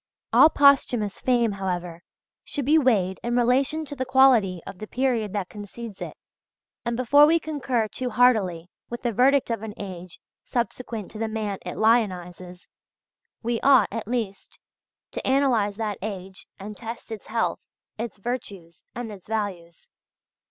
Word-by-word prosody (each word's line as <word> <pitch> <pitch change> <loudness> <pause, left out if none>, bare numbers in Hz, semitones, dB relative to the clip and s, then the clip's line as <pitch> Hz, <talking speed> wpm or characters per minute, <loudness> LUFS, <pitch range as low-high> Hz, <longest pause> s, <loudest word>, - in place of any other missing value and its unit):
All 310 - +8
posthumous 260 -8 +3
fame, 240 -3 +2
however, 180 -3 -4 0.4
should 285 -4 -4
be 310 +3 +5
weighed 200 -9 +2
in 240 0 -1
relation 265 +6 +2
to 285 - -8
the 260 - -2
quality 255 -8 +4
of 180 - -9
the 215 - -7
period 245 -5 0
that 200 -3 -2
concedes 210 +1 -9
it, - - -6 0.7
and 235 -1 -2
before 285 +4 +6
we 335 +2 +4
concur 270 -8 -1
too 250 +4 -3
heartily 210 -8 +2 0.2
with 240 +1 -6
the 240 - +1
verdict 265 +3 +3
of 230 - -2
an 220 -1 -7
age 185 -3 -8 0.2
subsequent 235 -3 -4
to 215 - -9
the 225 - -1
man 215 -3 -3
it - - -6
lionises, 185 -5 0 0.8
we 235 0 -1
ought, 265 -7 +5
at 220 0 -5
least, 225 -5 -4 0.5
to - - -5
analyze 255 -7 +2
that 210 -2 -3
age 190 -2 -7
and 210 +2 -8
test 230 +1 -8
its 220 -3 -7
health, 225 0 -1 0.4
its 230 -1 -5
virtues, 200 -7 -6
and 240 -2 -5
its 195 -3 -12
values. 195 -6 -4
225 Hz, 155 wpm, -25 LUFS, 195-250 Hz, 0.8 s, All